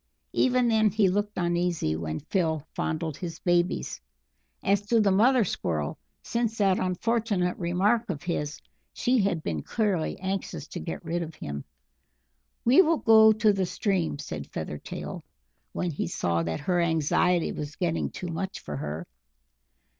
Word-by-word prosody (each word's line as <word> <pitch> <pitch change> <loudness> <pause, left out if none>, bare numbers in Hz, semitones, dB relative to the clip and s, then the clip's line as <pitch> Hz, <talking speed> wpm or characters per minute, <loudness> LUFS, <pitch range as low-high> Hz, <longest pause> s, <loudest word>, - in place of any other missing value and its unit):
Even 250 -1 +3
then 220 -2 +4
he 205 0 +3
looked 205 +2 -1
uneasy 175 - 0
when 80 -1 -4
Phil 160 -3 -1
fondled 160 -1 -2
his 170 -3 -5
babies; 175 - 0 0.6
as 200 0 +3
to 230 +1 +4
the 205 -2 +4
mother 235 +5 +5
Squirrel, 80 - -2 0.2
since 230 -1 -1
that 195 -2 +3
unfortunate 195 0 0
remark 190 +7 +1
of 155 -5 -4
his, 150 -4 -2 0.3
she 250 0 +2
had 195 -6 0
been 80 -3 -2
clearly 200 - -1
anxious 190 +1 -3
to - - -5
get 170 0 -6
rid 170 +2 -1
of 160 -1 -6
him. 70 - -6 1.0
"We 255 +9 +7
will 330 -2 +3
go 220 -3 +7
to 215 -1 +3
the 190 -2 0
stream," 185 -7 0
said 80 - -6
Feathertail, 75 - -6 0.5
when 180 - -2
he 140 - -2
saw 85 0 0
that 80 +4 -3
her 175 +2 +1
anxiety 170 +2 +2
was 150 0 -6
getting 170 -3 -1
too 180 - -6
much 190 +4 -4
for 75 -1 -6
her. 75 +4 -4
180 Hz, 155 wpm, -27 LUFS, 155-210 Hz, 1.0 s, We